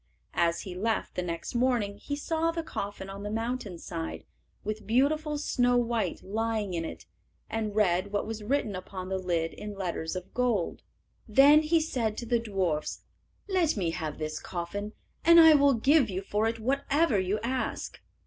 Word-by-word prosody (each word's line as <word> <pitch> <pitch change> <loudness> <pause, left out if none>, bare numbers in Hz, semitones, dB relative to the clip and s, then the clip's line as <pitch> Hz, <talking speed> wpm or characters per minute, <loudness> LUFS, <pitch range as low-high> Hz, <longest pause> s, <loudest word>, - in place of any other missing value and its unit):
As 170 0 +1
he 185 - -7
left 220 +5 -1
the - - -2
next 170 -2 -4
morning 240 -5 +1
he 285 - -4
saw 320 +3 0
the 330 0 -2
coffin 200 -8 -5
on 195 +1 -7
the 205 - -4
mountain 225 -3 -3
side, 80 - -5 0.4
with 215 -1 -4
beautiful 295 +6 +2
Snow 245 -4 +2
white 230 -6 -1
lying 215 -1 -1
in 165 -1 -1
it, - - -7 0.5
and 215 -2 -2
read 190 -2 +2
what 205 - 0
was 225 0 -5
written 220 -3 0
upon 185 0 -6
the 190 0 -1
lid 170 -3 -1
in 210 -1 -7
letters 175 -3 -3
of 185 0 -7
gold. 240 -8 0 0.5
Then 280 +7 +7
he 320 +2 +3
said 235 -9 -1
to 240 - -4
the 235 0 +2
dwarfs, 190 -9 -2 0.4
"Let 360 - +1
me 175 -4 0
have 155 -3 -4
this 155 0 -3
coffin, 200 +4 -5 0.3
and 335 +1 +8
I 320 -1 +9
will 285 -2 +5
give 270 +2 +4
you 190 0 -3
for 210 +3 0
it 225 0 -1
whatever 275 +1 +2
you 190 +3 0
ask." 255 +2 -3
215 Hz, 175 wpm, -29 LUFS, 185-255 Hz, 0.5 s, I